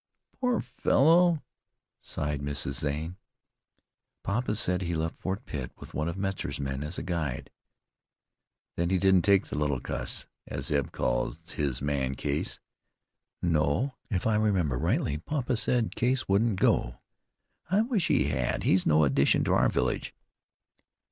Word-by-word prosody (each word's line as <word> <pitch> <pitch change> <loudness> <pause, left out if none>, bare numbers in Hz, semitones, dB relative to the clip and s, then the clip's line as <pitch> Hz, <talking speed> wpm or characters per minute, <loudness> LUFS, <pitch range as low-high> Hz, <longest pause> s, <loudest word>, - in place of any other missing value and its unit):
"Poor 250 -2 +1
fellow!" 160 +6 +3 0.6
sighed 75 -1 -3
Mrs. 70 -1 -3
Zane. 80 +3 -2 1.1
"Papa 105 +2 -1
said 90 -3 0
he 85 -2 -2
left 80 +1 -2
Fort 95 +2 -3
Pitt 65 -4 -5
with - - -11
one 75 +2 -1
of 85 - -5
Metzar's 95 -8 -3
men 70 -1 -3
as 75 +4 -4
a - - -3
guide." 80 -8 -3 1.2
"Then 85 0 0
he 95 - +3
didn't 95 -1 +4
take 100 0 +4
the - - -6
'little 75 -3 0
cuss,' - - -3 0.2
as 70 +1 -4
Eb 70 -1 0
calls 80 +7 -2
his 70 -3 -2
man 70 -2 0
Case?" 70 +2 -2 0.8
"No, 85 - +1 0.2
if 95 -5 -1
I 110 -1 +3
remember 95 -10 +1
rightly 75 +4 0
papa 130 - -1
said 120 0 0
Case 130 +2 +1
wouldn't 100 0 +2
go." - - +2 0.7
"I 195 +4 +4
wish 225 - +1
he - - +3
had. - - -1
He's 90 0 +3
no 75 0 +5
addition 70 0 +3
to - - +1
our - - +4
village." - - -1
85 Hz, 150 wpm, -28 LUFS, 70-110 Hz, 1.2 s, no